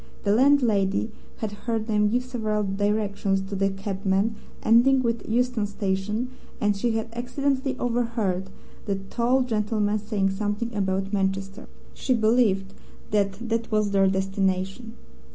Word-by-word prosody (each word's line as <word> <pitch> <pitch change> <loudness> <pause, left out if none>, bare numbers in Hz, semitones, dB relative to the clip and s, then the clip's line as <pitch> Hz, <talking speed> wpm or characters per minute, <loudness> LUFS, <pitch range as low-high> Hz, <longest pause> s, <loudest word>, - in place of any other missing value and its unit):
The 200 - +3
landlady 225 -6 +3 0.3
had 215 -2 -3
heard 220 +1 -3
them 210 -2 +2
give 245 +3 +1
several 215 -4 -1
directions 200 0 0
to 195 +1 -5
the 195 0 +2
cabman, 195 +2 -1 0.3
ending 255 +4 +5
with 230 -1 -2
Euston 240 -2 +1
Station, 205 +4 -2 0.3
and 205 -1 +2
she 230 +4 0
had 225 0 -1
accidentally 260 +2 -1
overheard 230 -6 -1 0.4
the 200 - +1
tall 235 +7 +1
gentleman 215 -2 0
saying 205 -2 0
something 205 +4 -2
about 195 0 -1
Manchester. 195 +3 -1 0.3
She 255 - 0
believed 215 -4 +2 0.4
that 205 +2 0
that 230 0 -1
was 210 -1 +2
their 195 -1 +4
destination. 195 +3 -1
210 Hz, 135 wpm, -25 LUFS, 195-235 Hz, 0.4 s, ending